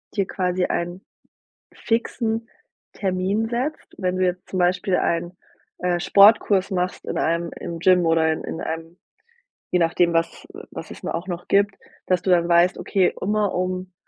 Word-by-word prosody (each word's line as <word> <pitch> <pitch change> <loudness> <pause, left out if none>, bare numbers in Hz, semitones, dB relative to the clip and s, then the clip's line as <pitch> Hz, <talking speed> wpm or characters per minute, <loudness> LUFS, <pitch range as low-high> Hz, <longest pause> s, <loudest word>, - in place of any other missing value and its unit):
dir 195 - +1
quasi 185 -1 -1
einen 175 +2 -3 0.7
fixen 225 0 -1 0.4
Termin 195 +3 -1
setzt? 255 +6 -3
Wenn 185 -1 -1
du 185 - +1
jetzt 180 0 -2
zum 185 - -2
Beispiel 180 +1 +2
einen, 170 +1 -1 0.4
äh, 180 -1 0
Sportkurs 200 0 +5
machst 180 -1 -2
in - - -3
einem 170 +1 0
im 165 -1 -6
Gym 180 -1 +4
oder 160 -1 +3
in 160 - -5
in - - -5
einem 165 +1 -5 0.8
je 180 - +3
nachdem, 170 +1 +2
was 165 0 -1 0.2
was - - -8
es - - -12
nur - - -2
auch 170 - -6
noch 175 -2 -6
gibt, 200 0 +3 0.3
dass 185 -1 +1
du 190 - 0
dann 170 -1 +3
weißt, 175 +1 +4
okay, 190 -3 +1
immer 210 +1 0
um, 185 0 -2
180 Hz, 165 wpm, -23 LUFS, 170-195 Hz, 0.8 s, Sportkurs